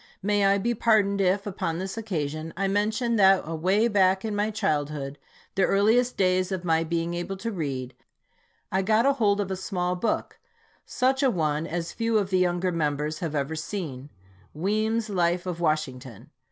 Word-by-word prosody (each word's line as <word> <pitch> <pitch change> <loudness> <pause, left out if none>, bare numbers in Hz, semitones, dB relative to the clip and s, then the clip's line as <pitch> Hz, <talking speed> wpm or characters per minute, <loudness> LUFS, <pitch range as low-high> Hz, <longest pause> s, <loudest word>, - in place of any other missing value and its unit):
May 205 0 +2
I 200 0 +4
be 235 +5 0
pardoned 205 -3 +2
if, 195 +1 +1
upon 180 -5 -3
this 190 +2 -4
occasion, 160 -7 -4
I 195 +1 0
mention 215 +4 0
that 195 -1 +5
away 185 +8 +1
back 190 -2 +2
in 215 -2 -2
my 205 +1 0
childhood, 150 -9 -2 0.3
the 195 - 0
earliest 220 +6 +3
days 185 0 +2
of 185 -2 -3
my 165 -1 +2
being 165 +1 -2
able 175 +3 -4
to 230 +4 -4
read, 135 - -4 0.8
I 190 - +1
got 220 +4 +2
hold 205 -3 +2
of 195 -2 -2
a - - -1
small 180 -1 -2
book, 205 +6 -2 0.5
such 265 +2 +1
a 270 - +4
one 155 -5 -1
as 170 0 -3
few 230 -1 0
of 195 -2 -1
the 185 - +3
younger 180 0 +1
members 150 -1 -1
have 160 -3 -3
ever 145 +2 -1
seen, 150 -5 -5 0.2
" 95 +7 -30
Weems' 215 +6 0
Life 175 -3 0
of 180 -2 -4
Washington." 135 - -3
185 Hz, 180 wpm, -26 LUFS, 160-205 Hz, 0.8 s, that